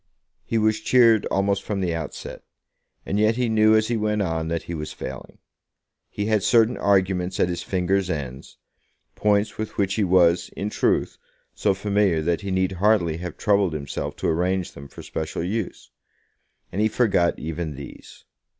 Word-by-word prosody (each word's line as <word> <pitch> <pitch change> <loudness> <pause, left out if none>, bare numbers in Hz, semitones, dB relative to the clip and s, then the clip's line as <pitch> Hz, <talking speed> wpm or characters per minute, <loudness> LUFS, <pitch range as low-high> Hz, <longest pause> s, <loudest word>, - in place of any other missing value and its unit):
He 115 - -1
was 110 0 +2
cheered 115 -1 +4
almost 100 0 0
from 100 -1 -3
the 90 -3 -1
outset, 80 -3 -6 0.6
and 100 - -1
yet 110 +1 +3
he 125 0 0
knew 110 0 +4
as 110 0 +3
he 120 - +1
went 105 -1 0
on 80 -3 -2
that 85 0 -2
he 85 - -6
was 75 -2 -5
failing. 65 -1 -8 0.7
He 105 - -3
had 110 -1 +2
certain 115 +3 +4
arguments 95 -2 +1
at 90 - +3
his 85 - -3
fingers' 95 0 0
ends, 65 -5 -5 0.6
points 105 0 +1
with 110 - -5
which 100 -1 +1
he 105 - +1
was, 90 -2 +3
in 105 +2 -3
truth, - - 0 0.3
so 100 -2 +1
familiar 100 -4 +1
that 85 +3 0
he 100 - -5
need 95 0 +1
hardly 95 -4 +2
have 90 +1 -7
troubled 100 -4 +2
himself 70 -2 -4
to - - -3
arrange 90 +2 0
them 70 0 -11
for - - -12
special 80 +1 -4
use, 105 +3 -4 0.8
and 100 - -2
he 110 - +4
forgot 105 -6 +2
even 80 -1 -4
these. 70 0 -12
95 Hz, 175 wpm, -23 LUFS, 85-105 Hz, 0.8 s, cheered